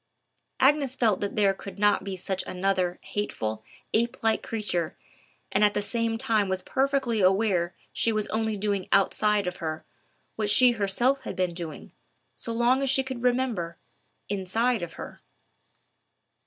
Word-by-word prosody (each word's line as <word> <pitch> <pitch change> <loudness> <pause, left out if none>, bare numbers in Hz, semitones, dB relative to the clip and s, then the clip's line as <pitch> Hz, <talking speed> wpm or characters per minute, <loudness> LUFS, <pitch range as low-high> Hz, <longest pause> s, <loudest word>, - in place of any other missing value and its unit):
Agnes 275 -1 +3
felt 220 -7 +2
that 205 - -3
there 200 -2 +3
could 195 +1 -10
not 205 -1 +3
be 195 -1 -4
such 185 +1 -3
another 185 -1 0
hateful, 110 - -3 0.3
ape 235 +3 +1
like 225 -1 +2
creature, 190 -7 -3 0.5
and 195 - +3
at 205 0 +4
the - - +1
same 230 +1 -1
time 215 -3 +1
was 190 0 -1
perfectly 270 -5 0
aware 185 -2 +2 0.2
she 230 - +2
was 215 -1 0
only 220 -1 -1
doing 200 -2 -1
outside 205 +1 +3
of 180 0 -3
her 160 -1 -4 0.5
what 215 -2 0
she 250 +4 +6
herself 240 +5 +1
had 255 - -6
been 180 -2 0
doing, 170 -2 -7 0.4
as - - -10
long 240 +3 +2
as 275 - +1
she 265 +1 +3
could 260 -2 -6
remember, 245 -9 0 0.5
inside 205 +4 0
of 170 -1 -5
her. - - -9
210 Hz, 155 wpm, -27 LUFS, 190-235 Hz, 0.5 s, she